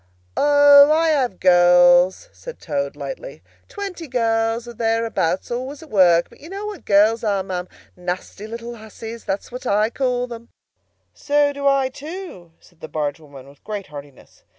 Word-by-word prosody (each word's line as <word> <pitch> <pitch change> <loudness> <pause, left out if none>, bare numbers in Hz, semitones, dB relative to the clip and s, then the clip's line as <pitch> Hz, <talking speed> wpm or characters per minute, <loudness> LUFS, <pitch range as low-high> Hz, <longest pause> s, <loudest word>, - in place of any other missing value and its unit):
"O, 285 0 +6
I 325 +1 +3
have 260 - 0
girls," 175 0 +5
said - - -10
Toad 140 -3 -3
lightly: - - -8 0.3
"twenty 390 -5 -7
girls 230 -1 0
or 240 - -8
thereabouts, 225 -6 -1
always 260 +5 -5
at 315 - -16
work. 175 -4 +4
But - - -20
you 315 - -12
know 400 +2 -6
what 420 -2 -8
girls 215 +3 +3
are, 200 -3 0
ma'am! 185 -1 -5 0.3
Nasty 180 +3 -6
little 235 +1 -7
hussies, 225 +1 -10
that's 195 +4 -4
what 250 +1 -7
I 210 +2 +2
call 250 -2 -2
'em!" 230 0 -12 0.6
"So 290 0 +1
do 280 0 -2
I, 275 -1 +2
too," 290 - -9
said 175 - -24
the 160 - -8
barge 150 -1 -3
woman 140 -4 -14
with 140 0 -19
great 210 -2 -5
heartiness. 140 -2 -13
225 Hz, 165 wpm, -21 LUFS, 180-280 Hz, 0.6 s, O